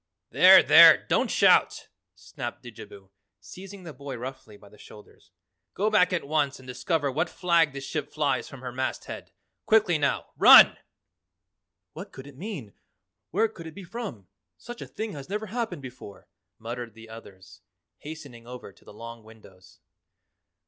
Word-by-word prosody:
"There, - - +7
there, - - +7
don't - - 0
shout!" - - +2 0.3
snapped - - -8
Didjabo, 95 -1 -13 0.3
seizing 185 - -12
the 165 -3 -9
boy 140 -1 -8
roughly 120 -4 -9
by 100 - -18
the 105 - -19
shoulders. 105 - -17 0.5
"Go 210 +3 0
back 180 -4 +3
at 180 -5 -2
once 145 -2 -1
and 130 - -16
discover 140 +3 -2
what 160 +6 -2
flag 170 -4 +1
this 135 0 -8
ship 150 0 -5
flies 150 -2 -2
from 135 -3 -12
her 125 -1 -6
masthead. 130 +1 -6 0.4
Quickly 210 -7 +3
now. 140 -1 -2
RUN!" - - +8 1.2
"What - - -10
could 130 - -12
it 140 -1 -14
mean? 145 - -8 0.6
Where 215 +6 +1
could 170 -7 -12
it 160 - -12
be 200 - -10
from? 180 - -8 0.3
Such 240 +1 -11
a - - -8
thing 220 0 -6
has 140 0 -10
never 210 +2 -4
happened 215 - -5
before!" 125 -5 -12 0.3
muttered 120 0 -8
the 115 0 -14
others, 95 -5 -14 0.4
hastening 140 -6 -11
over 125 -5 -10
to - - -25
the - - -15
long 115 +2 -10
windows. 95 -4 -19
140 Hz, 160 wpm, -26 LUFS, 115-175 Hz, 1.2 s, RUN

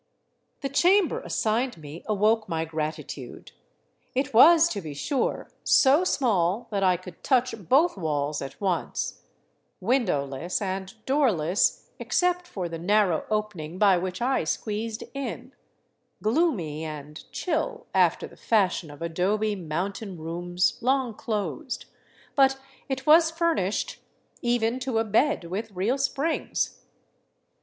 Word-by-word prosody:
The 275 - -2
chamber 360 +6 +3
assigned 230 +2 -1
me 155 +1 -9
awoke 215 +1 +2
my 160 0 -1
gratitude. 155 -1 -5 0.6
It 265 +1 -1
was, 330 +8 +8
to 205 - -3
be 155 -4 -7
sure, 255 - -2
so 280 +6 +5
small 220 - +1
that 200 -1 0
I 185 -2 +4
could 180 -1 -12
touch 255 -2 +2 0.2
both 295 - +4
walls 150 -3 -1
at 135 - -7
once, 190 -3 -2 0.6
windowless 180 - 0
and 190 -1 -3
doorless, 215 - +1
except 360 0 +1
for 185 - -4
the 165 -1 -6
narrow 190 -2 +2
opening 205 -7 -3
by 200 -1 +5
which 185 +4 -3
I 260 -4 +1
squeezed 215 +6 -3
in, 275 0 -5 0.7
gloomy 215 - +1
and 150 -1 -7
chill, 320 -3 -2
after - - +3
the - - -13
fashion 190 -7 +1
of 145 +2 -9
adobe 205 +6 0
mountain 185 +3 -4
rooms 175 +3 -1
long 260 -1 +1
closed; 210 - -4 0.5
but 270 -1 +4 0.3
it 265 0 -3
was 320 +2 +7
furnished, 325 - -1 0.4
even 240 0 +1
to 255 -3 -2
a 225 - +3
bed 225 - +2
w4th 195 +7 -4
real 220 +9 0
springs. 275 +4 -1
210 Hz, 125 wpm, -26 LUFS, 175-265 Hz, 0.7 s, was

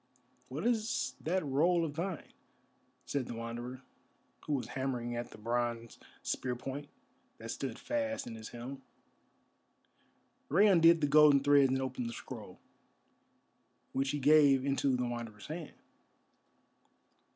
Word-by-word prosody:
"What - - -4
is 230 -2 0
that 185 +1 0
roll 165 +5 +2
of 150 -2 -5
thine?" 175 +2 -4 0.7
said 140 -4 -2
the 120 - -5
Wanderer, 120 +3 -6 0.6
who 150 - 0
was 135 -3 -2
hammering 125 -3 -3
at 120 0 -4
the - - -12
bronze 115 +1 -2 0.2
spear 125 -1 -2
point, 135 +4 -6 0.5
that 115 0 -6
stood 130 -2 -4
fast 280 -1 -2
in 115 - -7
his 110 -1 -8
helm. 130 +3 -8 1.7
Rei 205 - +5
undid 170 -4 +6
the 145 - +3
golden 145 -1 +7
threads 140 -1 +5
and 130 +1 +1
opened 125 -2 -3
the - - -6
scroll, - - -9 1.3
which 135 0 0
he 145 - -1
gave 140 -2 +5
into 135 -1 +1
the 125 - -1
Wanderer's 115 -3 -6
hand. 155 0 -7
135 Hz, 135 wpm, -33 LUFS, 120-155 Hz, 1.7 s, golden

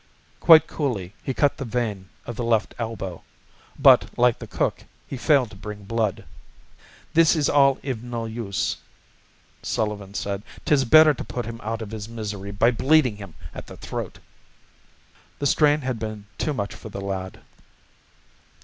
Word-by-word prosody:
Quite 160 -2 +8
coolly 110 - -3
he - - -3
cut 140 +2 +1
the 140 - -4
vein 110 -6 -3 0.2
at 120 - -6
the 120 - -3
left 115 -2 +1
elbow, 95 -7 -5 0.6
but, - - +6
like 120 -1 +3
the - - -8
cook, - - -2 0.2
he - - -5
failed 130 -3 +2
to - - -11
bring 105 +1 -8
blood. 110 -1 -1 0.9
"This 165 +1 +5
is 150 -3 +1
all 140 -2 +4
iv 130 -5 -3
no 120 -2 -4
use," 110 -3 -2 0.8
Sullivan 105 -2 -3
said. 100 -1 -3 0.2
"'Tis 140 -3 +3
better 155 +5 +7
to - - -6
put 120 - -5
him 115 0 -7
out 110 +1 -3
iv 105 - -9
his 110 -1 -6
misery 105 -3 -5
by 100 +4 +3
bleedin' 130 -1 +3
him 100 -6 -10 0.2
at - - -9
the - - -11
throat." - - -6 1.2
The 145 - -3
strain 150 +1 +4
had 130 -3 -3
been 110 -2 -6
too 150 - 0
much 100 -3 -3
for 110 - -10
the 100 - -6
lad. 95 -1 -5
115 Hz, 165 wpm, -24 LUFS, 100-135 Hz, 1.2 s, Quite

